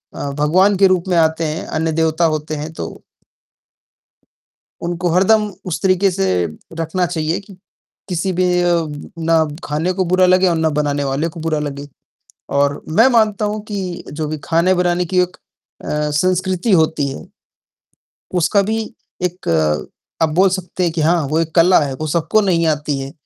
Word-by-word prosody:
अ, 140 Hz, -, -4 dB
भगवान 185 Hz, +7 st, +3 dB
के 195 Hz, 0 st, +6 dB
रूप 185 Hz, -1 st, +1 dB
में 180 Hz, -2 st, +1 dB
आते 160 Hz, 0 st, +2 dB
हैं। 155 Hz, +1 st, -3 dB
अन्न 160 Hz, +1 st, -1 dB
देवता 160 Hz, +1 st, +2 dB
होते 155 Hz, 0 st, -4 dB
हैं 150 Hz, +1 st, -5 dB
तो 80 Hz, -, -5 dB, 2.0 s
उनको 175 Hz, +1 st, -1 dB
हरदम 210 Hz, +5 st, +3 dB, 0.2 s
उस 175 Hz, -, -3 dB
तरीक़े 190 Hz, 0 st, +3 dB
से 95 Hz, -, 0 dB, 0.5 s
रखना 170 Hz, +3 st, 0 dB
चाहिए 165 Hz, 0 st, -2 dB
कि, 195 Hz, -2 st, -15 dB, 0.5 s
किसी 180 Hz, +2 st, -1 dB
भी 180 Hz, +1 st, +1 dB, 0.8 s
ना 165 Hz, -1 st, +4 dB, 0.2 s
ख़ाने 155 Hz, +5 st, -1 dB
को 185 Hz, 0 st, -1 dB
बुरा 185 Hz, +1 st, +3 dB
लगे 185 Hz, +1 st, +4 dB
और 170 Hz, -, +2 dB
ना 160 Hz, 0 st, +1 dB
बनाने 145 Hz, -1 st, 0 dB
वाले 140 Hz, +4 st, -1 dB
को 165 Hz, -, -10 dB
बुरा 160 Hz, -1 st, -1 dB
लगे। 145 Hz, -1 st, -5 dB, 0.7 s
और 140 Hz, 0 st, +1 dB
मैं 220 Hz, +10 st, +5 dB
मानता 215 Hz, -3 st, +2 dB
हूँ 210 Hz, +1 st, -2 dB
कि 190 Hz, -4 st, -5 dB
जो 155 Hz, +1 st, -3 dB
भी 155 Hz, +1 st, -4 dB
ख़ाने-बनाने 180 Hz, +1 st, +2 dB
की 185 Hz, +2 st, 0 dB
एक 180 Hz, 0 st, -2 dB, 0.5 s
अ, -, -, -7 dB, 0.2 s
संस्कृति 185 Hz, +6 st, 0 dB
होती 160 Hz, -4 st, +2 dB
है, 135 Hz, +5 st, -7 dB, 1.1 s
उसका 200 Hz, +4 st, +3 dB
भी 220 Hz, +3 st, -1 dB, 0.4 s
एक 180 Hz, 0 st, -3 dB, 0.7 s
आप 160 Hz, -, +4 dB
बोल 190 Hz, +2 st, +5 dB
सकते 185 Hz, 0 st, -3 dB
हैं 170 Hz, -, 0 dB
कि 165 Hz, -, -2 dB
हाँ 165 Hz, +2 st, +3 dB
वो 155 Hz, +3 st, +1 dB
एक 160 Hz, -1 st, -3 dB
कला 180 Hz, +2 st, +6 dB
है, 140 Hz, -3 st, -2 dB
वो 155 Hz, +4 st, -4 dB
सबको 170 Hz, +7 st, +1 dB
नहीं 175 Hz, -5 st, +1 dB
आती 150 Hz, -2 st, 0 dB
है। 135 Hz, +1 st, -6 dB
170 Hz, 170 wpm, -18 LUFS, 155-185 Hz, 2.0 s, के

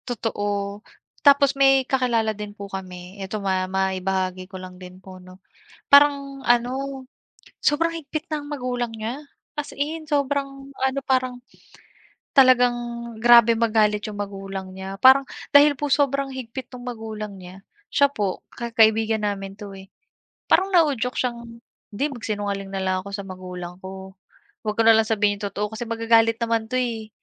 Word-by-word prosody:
Totoo, 205 Hz, -4 st, -3 dB, 0.4 s
tapos 280 Hz, -1 st, +5 dB
may 270 Hz, -1 st, +4 dB
kakilala 240 Hz, -4 st, +1 dB
din 210 Hz, 0 st, -8 dB
po 200 Hz, -, -7 dB
kami, 185 Hz, 0 st, -8 dB
ito 195 Hz, +3 st, -4 dB
ma 190 Hz, -2 st, -1 dB
ma 190 Hz, 0 st, 0 dB
maibahagi 185 Hz, 0 st, -2 dB
ko 190 Hz, -, -8 dB
lang 185 Hz, 0 st, -11 dB
din 180 Hz, 0 st, -11 dB
po 185 Hz, -1 st, -13 dB
'no. 185 Hz, 0 st, -14 dB, 0.5 s
Parang 280 Hz, -1 st, +4 dB
ano, 260 Hz, +3 st, 0 dB, 0.6 s
sobrang 330 Hz, +3 st, +2 dB
higpit 310 Hz, 0 st, -5 dB
ng 295 Hz, -1 st, -4 dB
magulang 250 Hz, -4 st, -3 dB
niya 225 Hz, +5 st, -5 dB, 0.3 s
as 295 Hz, -1 st, -4 dB
in 310 Hz, +3 st, -3 dB
sobrang 280 Hz, -2 st, -2 dB
ano 265 Hz, +1 st, -1 dB
parang, 255 Hz, -1 st, 0 dB, 1.0 s
talagang 255 Hz, -2 st, +6 dB, 0.5 s
grabe 235 Hz, -1 st, +7 dB
magalit 215 Hz, -2 st, +2 dB
yung 205 Hz, -, -9 dB
magulang 195 Hz, -2 st, -6 dB
niya 190 Hz, +1 st, -7 dB
parang 265 Hz, +4 st, +7 dB, 0.3 s
dahil 290 Hz, +1 st, +8 dB
po 295 Hz, -, -1 dB
sobrang 275 Hz, -1 st, +1 dB
higpit 255 Hz, 0 st, -7 dB
nung 245 Hz, -, -10 dB
magulang 220 Hz, -4 st, -6 dB
niya, 185 Hz, +1 st, -12 dB, 0.2 s
siya 280 Hz, 0 st, +3 dB
po 205 Hz, -8 st, -3 dB
ka 235 Hz, -1 st, -6 dB
kaibigan 220 Hz, 0 st, +4 dB
namin 195 Hz, -1 st, -3 dB
'to, 205 Hz, 0 st, -9 dB
eh, 190 Hz, 0 st, -12 dB, 0.6 s
parang 380 Hz, -, +3 dB
nauudyok 285 Hz, -9 st, +2 dB
siyang 245 Hz, -2 st, -1 dB, 0.5 s
"'di 225 Hz, +7 st, -1 dB
magsinungaling 205 Hz, -7 st, -4 dB
na 195 Hz, -, -4 dB
lang 190 Hz, 0 st, 0 dB
ako 200 Hz, -, -9 dB
sa 200 Hz, 0 st, -5 dB
magulang 180 Hz, -2 st, -8 dB
ko, 190 Hz, 0 st, -9 dB, 0.5 s
huwag 210 Hz, -1 st, -3 dB
ko -, -, +5 dB
na 225 Hz, -, +8 dB
lang 220 Hz, -, +5 dB
sabihin 210 Hz, -2 st, +2 dB
yung 200 Hz, -1 st, -3 dB
totoo 210 Hz, +2 st, -4 dB
kasi 220 Hz, -, -6 dB
magagalit 230 Hz, 0 st, +3 dB
naman 230 Hz, -1 st, -1 dB
'to 255 Hz, -, -1 dB
eh." 230 Hz, -3 st, -2 dB
225 Hz, 160 wpm, -23 LUFS, 195-265 Hz, 1.0 s, dahil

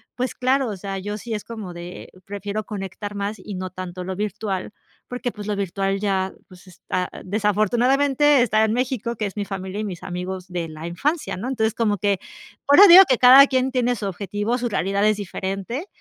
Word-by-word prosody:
pues 255 Hz, +1 st, -2 dB
claro, 260 Hz, +1 st, +1 dB
o 210 Hz, -, -4 dB
sea, 195 Hz, +1 st, -5 dB
yo 205 Hz, +2 st, -4 dB
sí 230 Hz, +2 st, -6 dB
es 210 Hz, -, -4 dB
como 215 Hz, -6 st, -7 dB
de: 175 Hz, +1 st, -9 dB, 0.2 s
"Prefiero 205 Hz, +1 st, -5 dB
conectar 205 Hz, 0 st, -6 dB
más 200 Hz, +1 st, -3 dB
y 195 Hz, +1 st, -7 dB
no 185 Hz, 0 st, -4 dB
tanto 185 Hz, 0 st, -7 dB
lo 190 Hz, +1 st, -4 dB
virtual" 205 Hz, -1 st, -3 dB, 0.4 s
porque 250 Hz, 0 st, -3 dB
pues 210 Hz, -2 st, -9 dB
lo 210 Hz, -, -1 dB
virtual 195 Hz, 0 st, -1 dB
ya, 190 Hz, -2 st, 0 dB, 0.2 s
pues 185 Hz, +1 st, -16 dB
está 180 Hz, 0 st, -4 dB
desafortunadamente 245 Hz, +8 st, +2 dB
está 220 Hz, -2 st, +3 dB
en 220 Hz, -, 0 dB
México, 245 Hz, -2 st, -2 dB
que 215 Hz, -, -3 dB
es 200 Hz, +1 st, -6 dB
mi 205 Hz, -, -2 dB
familia 190 Hz, 0 st, -5 dB
y -, -, -2 dB
mis 180 Hz, -3 st, -7 dB
amigos 185 Hz, 0 st, -5 dB
de 175 Hz, -2 st, -3 dB
la 155 Hz, +1 st, -9 dB
infancia, 285 Hz, -, -2 dB
¿no?, 225 Hz, -, -5 dB
entonces 220 Hz, -4 st, 0 dB
como 210 Hz, -3 st, +1 dB
que 200 Hz, 0 st, 0 dB, 0.5 s
ahora 360 Hz, +9 st, +9 dB
digo 370 Hz, +2 st, +11 dB
que 255 Hz, -, +3 dB
cada 260 Hz, +3 st, +9 dB
quien 260 Hz, 0 st, 0 dB
tiene 245 Hz, -1 st, +1 dB
su 215 Hz, -, -5 dB
objetivo, 205 Hz, +5 st, -2 dB
su 245 Hz, -1 st, -2 dB
realidad 200 Hz, 0 st, 0 dB
es 215 Hz, -, +3 dB
diferente, 200 Hz, -, -4 dB
205 Hz, 200 wpm, -22 LUFS, 190-240 Hz, 0.5 s, digo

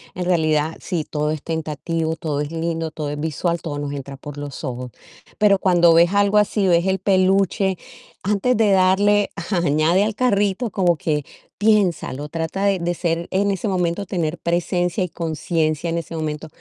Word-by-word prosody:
En 180 Hz, -, -3 dB
realidad, 155 Hz, -3 st, +1 dB
sí, 170 Hz, -5 st, -3 dB
todo 150 Hz, 0 st, -2 dB
es 155 Hz, -2 st, -4 dB
tentativo, 160 Hz, 0 st, -2 dB
todo 155 Hz, -4 st, -3 dB
es 145 Hz, 0 st, -2 dB
lindo, 165 Hz, 0 st, -2 dB
todo 150 Hz, -2 st, -4 dB
es 145 Hz, 0 st, -4 dB
visual, 160 Hz, +2 st, -1 dB
todo 145 Hz, -3 st, -5 dB
nos 145 Hz, -1 st, -4 dB
entra 140 Hz, -1 st, -6 dB
por 145 Hz, +1 st, -9 dB
los 145 Hz, +1 st, -7 dB
ojos. 125 Hz, -2 st, -5 dB, 0.5 s
Pero 200 Hz, -2 st, +4 dB
cuando 175 Hz, -3 st, +4 dB
ves 170 Hz, +3 st, +5 dB
algo 205 Hz, +1 st, +3 dB
así, 210 Hz, -1 st, +2 dB
ves 170 Hz, +1 st, +3 dB
el 190 Hz, -1 st, +1 dB
peluche, 190 Hz, 0 st, +2 dB, 0.5 s
antes 210 Hz, +5 st, +1 dB
de 215 Hz, -3 st, +3 dB
darle 200 Hz, +2 st, +3 dB, 0.2 s
añade 170 Hz, +2 st, +2 dB
al 215 Hz, -1 st, -2 dB
carrito, 205 Hz, -2 st, +1 dB
como 180 Hz, -3 st, +2 dB
que 150 Hz, -3 st, -1 dB, 0.3 s
piénsalo, 180 Hz, -9 st, +1 dB
trata 165 Hz, +5 st, -2 dB
de 195 Hz, -2 st, +2 dB
de 175 Hz, +1 st, -1 dB
ser 170 Hz, 0 st, -2 dB
en 200 Hz, +1 st, +1 dB
ese 195 Hz, +2 st, -2 dB
momento, 180 Hz, +1 st, -1 dB
tener 170 Hz, -3 st, -2 dB
presencia 175 Hz, +2 st, 0 dB
y 180 Hz, -, -3 dB
conciencia 160 Hz, 0 st, -1 dB
en 165 Hz, -, -1 dB
ese 165 Hz, 0 st, -5 dB
momento, 155 Hz, 0 st, -4 dB
170 Hz, 175 wpm, -21 LUFS, 155-190 Hz, 0.5 s, ves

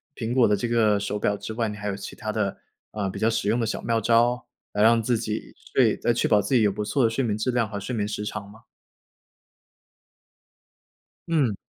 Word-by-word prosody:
苹 115 Hz, -1 st, -4 dB
果 125 Hz, -2 st, +5 dB
的 105 Hz, -, +3 dB
这 120 Hz, +3 st, -2 dB
个 110 Hz, -3 st, +3 dB
手 105 Hz, +1 st, -3 dB
表 105 Hz, 0 st, +1 dB
之 100 Hz, +2 st, -7 dB
外， 115 Hz, +1 st, -1 dB
你 105 Hz, -, -5 dB
还 105 Hz, 0 st, -4 dB
有 100 Hz, -, -3 dB
其 100 Hz, -, -8 dB
他 110 Hz, -, -4 dB
的， 105 Hz, -3 st, -1 dB, 0.4 s
呃， 100 Hz, -3 st, -2 dB
比 100 Hz, -, -6 dB
较 110 Hz, +2 st, +3 dB
实 115 Hz, -3 st, 0 dB
用 115 Hz, +3 st, +2 dB
的 115 Hz, -, +1 dB
小 110 Hz, -, -3 dB
妙 115 Hz, 0 st, +1 dB
招， 120 Hz, +2 st, +2 dB, 0.3 s
来 105 Hz, -, -1 dB
让 115 Hz, +1 st, +5 dB
自 120 Hz, 0 st, +1 dB
己 110 Hz, -1 st, -4 dB, 0.2 s
睡 -, -, +4 dB
再 -, -, +1 dB
确 -, -, 0 dB
保 105 Hz, -, +5 dB
自 105 Hz, +7 st, 0 dB
己 120 Hz, -, +5 dB
有 105 Hz, -2 st, +3 dB
不 105 Hz, +2 st, -4 dB
错 125 Hz, +5 st, +1 dB
的 115 Hz, -, +4 dB
睡 115 Hz, +4 st, -1 dB
眠 105 Hz, -2 st, -1 dB
质 125 Hz, +4 st, 0 dB
量 120 Hz, -3 st, 0 dB
和 105 Hz, -, -5 dB
睡 100 Hz, +6 st, -5 dB
眠 105 Hz, -3 st, -1 dB
时 105 Hz, 0 st, -4 dB
长 105 Hz, -1 st, -5 dB
吗？ 110 Hz, +2 st, -15 dB, 2.7 s
嗯。 145 Hz, -10 st, +2 dB
110 Hz, 250 characters per minute, -25 LUFS, 105-115 Hz, 2.7 s, 果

